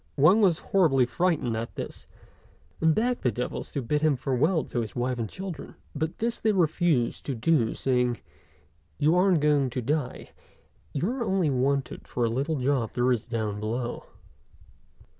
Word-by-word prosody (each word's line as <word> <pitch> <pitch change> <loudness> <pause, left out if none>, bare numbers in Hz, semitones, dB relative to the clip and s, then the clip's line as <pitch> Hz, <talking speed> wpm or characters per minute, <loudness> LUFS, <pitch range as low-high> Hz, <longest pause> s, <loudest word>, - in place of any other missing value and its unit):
Wang 170 +10 +6
was 180 -6 +4
horribly 155 -12 +3
frightened 155 -5 0
at 115 +1 -5
this, - - -7 0.7
and 160 -1 +4
begged 245 +2 0
the 125 - +2
devils 125 +1 -4
to 135 -4 -3
let 150 +2 +1
him 155 -2 +3
bid - - -11
farewell 150 +6 +1
to 120 - -3
his 110 - -6
wife 125 0 -1
and 110 -2 -2
children; 185 -6 -7 0.2
but 160 +2 -3
this 235 +1 -1
they 220 -1 +2
refused 160 -7 +1
to 135 - -1
do, 120 -1 +1
saying, 125 -2 0 0.8
"You 155 +2 +3
aren't 180 -3 +4
going 145 -3 +3
to 125 +1 -3
die; 145 0 -2 0.6
you 150 +6 -1
are 250 +1 -2
only 190 -8 +1
wanted 135 +1 -1
for 120 - -1
a - - +1
little 140 +7 -1
job 130 -4 0
there 125 +1 +2
is 120 -2 -1
down 110 -3 -2
below." 120 +3 -3
140 Hz, 175 wpm, -27 LUFS, 125-165 Hz, 0.8 s, Wang